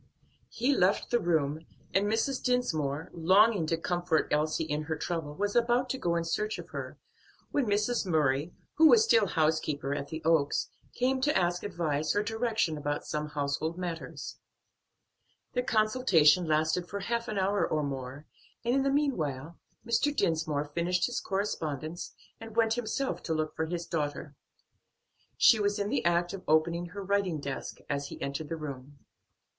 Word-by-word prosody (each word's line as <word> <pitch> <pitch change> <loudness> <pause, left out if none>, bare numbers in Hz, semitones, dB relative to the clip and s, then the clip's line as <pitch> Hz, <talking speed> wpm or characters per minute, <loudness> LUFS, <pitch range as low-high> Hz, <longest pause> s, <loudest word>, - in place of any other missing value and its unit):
He 255 +4 +1
left 190 0 +2
the 240 - +3
room, 160 -3 0 0.3
and 195 +2 +3
Mrs. 225 +5 0
Dinsmore, 160 - 0
longing 190 +2 +4
to 165 - +1
comfort 175 -1 0
Elsie 155 +2 +1
in 150 -1 -2
her 160 +1 -2
trouble, 155 -1 -4
was 205 +3 -1
about 240 +2 +2
to 265 - -3
go 170 -7 0
in 170 - 0
search 210 +6 -1
of - - -9
her, - - -6 0.5
when 275 -5 +1
Mrs. 210 +4 +1
Murray, 150 -1 +1 0.3
who 320 - +8
was 440 +5 +7
still 225 - +4
housekeeper 155 -4 0
at 140 0 -4
the 160 +2 -6
Oaks, 160 -3 +2 0.3
came 260 +1 +1
to 295 +2 +2
ask 175 -1 +1
advice 155 -6 -1
or 205 - +2
direction 220 -7 -1
about 145 0 -2
some 150 0 -3
household 150 +3 -2
matters. 175 -3 -5 1.2
Their 250 - +1
consultation 215 - +3
lasted 155 +3 +1
for 200 0 -4
half 235 +3 -2
an 215 - -3
hour 195 +1 +1
or 155 -1 0
more, 135 +1 -5 0.4
and 240 - +2
in 270 - +3
the 275 - +1
meanwhile 170 - -1 0.3
Mr. 235 +5 +2
Dinsmore 155 - 0
finished 170 +4 0
his 245 - -2
correspondence 165 -5 -3 0.3
and 225 -1 -10
went 225 -1 +3
himself 245 +3 -2
to 160 - -2
look 155 0 -2
for 160 - -1
his 170 0 -3
daughter. 150 -3 -3 1.0
She 225 - +6
was 205 0 +1
in 200 0 -1
the - - 0
act 175 +1 +2
of 195 - -6
opening 170 +3 +2
her 200 +3 -7
writing 195 -4 0
desk 140 -1 -5
as 140 0 -2
he - - -9
entered 140 +2 -4
the 165 - -3
room. 140 -2 -8
170 Hz, 170 wpm, -29 LUFS, 155-215 Hz, 1.2 s, who